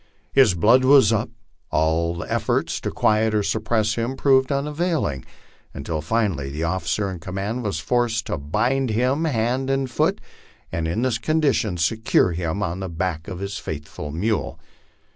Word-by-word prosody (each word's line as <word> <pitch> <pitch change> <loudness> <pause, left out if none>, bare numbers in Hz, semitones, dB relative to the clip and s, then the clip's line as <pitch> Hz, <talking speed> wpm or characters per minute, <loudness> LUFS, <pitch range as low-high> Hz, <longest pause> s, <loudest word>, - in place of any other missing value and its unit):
133 - - +6
His 110 -8 +5
blood 115 +9 +5
was 130 -5 +6
up, 110 +1 0
and 115 - -28 0.3
all 85 +2 0
efforts - - -1
to - - -2
quiet 110 0 +2
or 105 - +2
suppress 110 +1 0
him 120 +4 -2
proved 130 -1 +3
unavailing, 150 - -1 0.5
until 75 +2 -3
finally 90 -7 -1
the 75 +4 -4
officer 95 +3 -1
in 90 - -7
command 100 +7 -4
was 100 -7 -2
forced 115 +3 0
to - - -2
bind 120 - 0
him 130 +8 +1
hand 130 -1 0
and 135 -2 0
foot, - - +1 0.5
and 80 -1 -2
in 100 +9 -1
this 125 -4 0
condition 140 - +1
secured 90 0 +2
him 85 +4 -2
on 85 +3 -3
the 95 -1 -4
back 85 -1 -3
of 95 -3 -5
his 100 +2 -4
faithful 75 0 -6
mule. 105 +8 -2
105 Hz, 165 wpm, -23 LUFS, 85-125 Hz, 0.5 s, 133